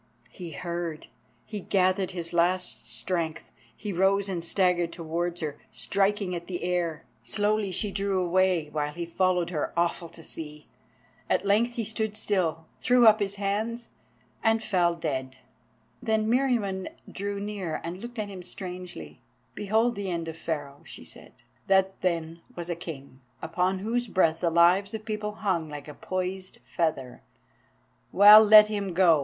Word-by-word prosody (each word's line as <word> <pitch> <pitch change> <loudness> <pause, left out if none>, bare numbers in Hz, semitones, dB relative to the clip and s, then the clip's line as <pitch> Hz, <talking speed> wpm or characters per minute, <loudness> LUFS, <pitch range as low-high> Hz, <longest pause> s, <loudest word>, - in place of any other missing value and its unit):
He 170 -3 -8
heard. 170 -2 -4 0.4
He 210 -2 -5
gathered 185 0 +1
his 175 -2 -5
last 180 +2 0
strength. 165 -3 -3 0.3
He 205 -2 -4
rose 195 +2 +2
and 175 -3 -3
staggered 175 -1 +1
towards 170 +1 -3
her, 150 -2 -4
striking 195 -1 0
at 170 -1 -5
the 175 -2 -4
air. 175 -3 -1 0.2
Slowly 205 - 0
she 205 +3 -1
drew 195 -1 0
away, 180 -2 +2
while 150 -1 -1
he 170 +2 -4
followed 180 0 +1
her, 155 -4 -2
awful 170 0 0
to 165 - -12
see. 150 -2 -7 0.6
At - - +1
length 225 +4 +2
he 230 - -1
stood 220 0 -2
still, 165 -7 0
he - - -12
threw 250 -1 +6
up 215 0 +7
his 200 -1 -1
hands, 215 +4 -2 0.5
and 225 0 +3
fell 175 -5 +2
dead. 130 -5 -3 0.6
Then 220 -2 +1
Meriamun 225 -7 +1 0.2
drew 200 +1 -4
near 200 -6 -4
and 170 +2 -5
looked 240 +3 -9
at 215 -1 -2
him 195 -2 -8
strangely. 180 - -8 0.3
"Behold 220 +4 +1
the 200 -3 -4
end 170 -2 -3
of 160 - -5
Pharaoh," 145 -4 -5
she - - -10
said. - - -12 0.2
"That 190 0 +2
then 170 -2 -1
was 175 0 -4
a - - -1
king, 140 -6 -9 0.2
upon 180 +3 0
whose 235 +5 -1
breath 165 -5 +2
the 170 - +1
lives 180 +5 +4
of 215 0 -7
peoples 210 -1 -4
hung 175 -7 0
like 145 -1 -8
a 150 - -8
poised 185 +3 -4
feather. 155 -7 -2 0.9
Well, 210 +3 +10
let 210 0 +9
him 200 -4 -3
go! 170 -4 +5
185 Hz, 160 wpm, -27 LUFS, 170-205 Hz, 0.9 s, Well